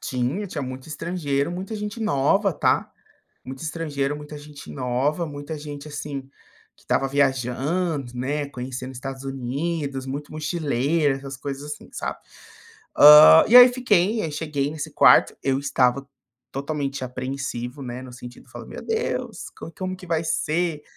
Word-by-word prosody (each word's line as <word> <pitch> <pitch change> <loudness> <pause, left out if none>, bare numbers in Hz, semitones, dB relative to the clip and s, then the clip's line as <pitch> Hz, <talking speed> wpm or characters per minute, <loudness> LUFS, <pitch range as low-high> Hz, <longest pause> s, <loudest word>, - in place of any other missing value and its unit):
Tinha, 140 +8 -2
tinha 150 -6 -5
muito 130 +2 -7
estrangeiro, 155 -2 -2
muita 190 +5 -5
gente 210 +2 -5
nova, 195 +2 +2
tá. - - +1 0.5
Muito 130 +2 -8
estrangeiro, 150 -3 -2
muita 150 0 -9
gente 145 -1 -11
nova, 135 +6 -1
muita 145 +1 -6
gente, 145 0 -8
assim, 145 -1 -5 0.5
que - - -24
estava 135 - +1
viajando, 140 +2 0
né, 145 +4 -2
conhecendo 130 0 -6
Estados 135 +1 -7
Unidos, 135 +1 -3
muito 145 +2 -5
mochileira, 150 -2 0
essas 135 0 -8
coisas, 140 +2 -6
assim, 150 - -10
sabe. - - -4 0.8
Hã, 150 +2 +10
e 245 - +8
aí 250 0 +11
fiquei, 220 -4 +2
aí 160 - -2
cheguei 145 -2 -2
nesse 155 -1 -6
quarto, 140 -4 +6
eu 135 -1 +1
estava 135 -1 +1 0.5
totalmente 140 -1 -3
apreensivo, 130 0 -5
né, 125 0 -6
no 125 -1 -10
sentido 125 0 -11
de - - -23
falar: - - -9
"Meu - - -9
Deus, 450 +1 -3
como 165 - -9
como 185 0 -4
que 180 - -12
vai 165 -1 0
ser?". 165 0 -1
145 Hz, 150 wpm, -24 LUFS, 135-160 Hz, 0.8 s, aí